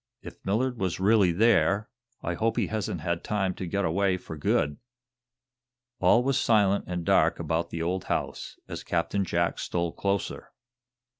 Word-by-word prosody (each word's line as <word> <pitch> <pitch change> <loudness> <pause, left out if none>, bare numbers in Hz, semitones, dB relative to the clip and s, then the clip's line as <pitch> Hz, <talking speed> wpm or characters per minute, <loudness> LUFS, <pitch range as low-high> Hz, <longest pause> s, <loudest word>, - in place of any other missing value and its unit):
"If - - -11
Millard 120 +5 0
was 95 -2 -1
really 100 -2 +4
there, 105 +1 +3 0.4
I 85 - -1
hope 110 +5 0
he - - +2
hasn't 105 -6 -3
had 85 +1 -2
time 95 -3 0
to 90 - -6
get 100 +2 -1
away 95 +3 +1
for 80 - -9
good." 75 -1 0 1.2
All 120 - +4
was 135 0 +1
silent 100 -5 +3
and 90 -2 -3
dark - - +3
about 85 +1 -1
the 85 -1 -4
old 90 +2 -2
house, - - -3
as - - -6
Captain 90 +3 0
Jack 85 -1 0
stole 85 -1 -2
closer. 100 +1 -3
95 Hz, 160 wpm, -27 LUFS, 85-105 Hz, 1.2 s, really